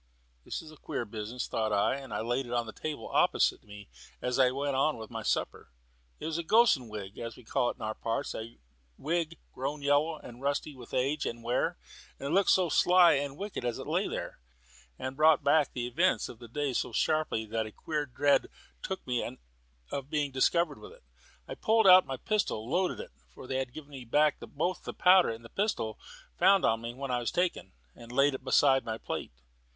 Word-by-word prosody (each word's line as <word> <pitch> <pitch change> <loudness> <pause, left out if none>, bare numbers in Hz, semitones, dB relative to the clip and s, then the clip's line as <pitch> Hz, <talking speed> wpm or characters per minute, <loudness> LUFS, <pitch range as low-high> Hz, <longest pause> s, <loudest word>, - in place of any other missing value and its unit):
"This - - -5
is 155 - -12
a 155 - -15
queer 120 - -4
business," 110 +3 -5
thought 110 -1 -1
I; 100 +4 +2
and 135 -4 -10
I 105 - -2
laid 120 +3 -1
it - - -8
on 120 -1 +1
the 110 - -8
table 155 -2 -5
opposite - - +3
me 105 -1 -12 0.3
as 125 +1 -1
I 130 -1 +6
went 140 +1 -2
on 145 +3 +2
with 110 0 -9
my 115 -1 -4
supper. - - -2 0.5
It - - -6
was 160 +1 -2
a - - -2
"gossan" 165 - +4
wig, 105 -2 -7
as 115 -1 -6
we 125 - -15
call 120 +2 0
it - - -5
in - - -10
our 110 0 -2
parts; 115 +1 -3
a 115 +1 -7 0.4
wig 165 +2 -2 0.2
grown 140 +3 -4
yellow 145 +3 +2
and 120 -3 -12
rusty 140 +2 -1
with 125 -3 -9
age 140 +4 0
and 115 0 -5
wear. 120 +2 0 0.4
It 140 - -5
looked 190 +5 +3
so 185 -2 +4
sly 175 +2 +6
and 140 0 -2
wicked 200 -7 -5
as 120 -1 -1
it - - -7
lay - - 0
there, - - -5 0.6
and 130 0 -5
brought 155 0 +5
back 145 0 +3
the 120 -2 -3
events 165 +10 +1
of 115 - -11
the 120 - -10
day 140 +3 -2
so - - -1
sharply 155 -8 0
that 110 0 -2
a - - -10
queer 150 +5 -3
dread 140 +3 +2 0.3
took 190 0 -5
me 125 -2 -2 0.5
of 140 0 -4
being 150 -2 0
discovered 150 +4 +2
with - - -11
it. - - -20 0.4
I - - -5
pulled 220 0 +2
out 185 0 +8
my 135 - -4
pistol, 165 - -1
loaded 180 +6 0
it - - -8 0.3
(they 130 +1 -4
had 130 -2 -3
given 150 +1 -10
me 130 -3 -9
back 150 +5 +3
both 175 +5 -3
the - - -6
powder 185 0 +6
and 115 0 -6
pistol 195 - -1 0.4
found 195 +2 +5
on 115 0 +2
me 115 +1 -6
when 135 0 -4
I 125 - +1
was 120 - -1
taken), 180 - -1 0.2
and 115 0 -12
laid 140 +3 +3
it 130 - -6
beside 135 0 +4
my 110 -1 -4
plate. - - -5
135 Hz, 215 wpm, -30 LUFS, 120-155 Hz, 0.6 s, out